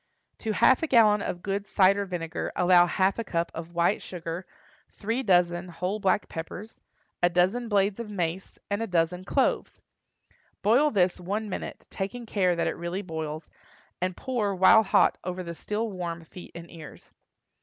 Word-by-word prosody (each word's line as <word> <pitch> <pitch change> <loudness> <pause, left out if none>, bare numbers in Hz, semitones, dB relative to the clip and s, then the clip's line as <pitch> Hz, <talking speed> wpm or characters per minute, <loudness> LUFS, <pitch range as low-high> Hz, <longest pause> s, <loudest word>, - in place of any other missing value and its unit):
To 220 - -2
half 260 +4 +4
a 325 - 0
gallon 215 -6 +5
of 175 -3 -4
good 200 0 -2
cider 200 +1 +3
vinegar 170 -3 -4
allow 180 0 +5
half 190 +4 +1
a - - -1
cup 170 -5 -2
of 165 +1 -8
white 170 +4 +2
sugar, 170 0 -6 0.4
three 225 +5 -2
dozen 175 -4 +2
whole 180 +5 -3
black 195 0 +1
peppers, 175 +6 -8 0.4
a 175 - +4
dozen 185 +7 +1
blades 200 0 +1
of 230 -2 -5
mace, 180 -2 -3
and 200 +2 -2
a 225 - -2
dozen 180 0 0
cloves. 265 +8 0 0.8
Boil 245 +9 +4
this 185 -7 +1
one 205 +5 -3
minute, - - -6
taking 235 +5 -4
care 185 -5 +1
that 170 - 0
it - - 0
really 175 +4 -4
boils, 160 -3 -5 0.5
and 185 0 -1
pour 225 -7 -1
while 190 +4 +7
hot 215 - +3
over 180 0 -4
the 170 -1 -6
still 210 +6 -3
warm 170 -3 -5
feet 175 +2 -12
and 170 0 -10
ears. 160 -3 -12
185 Hz, 170 wpm, -27 LUFS, 175-210 Hz, 0.8 s, while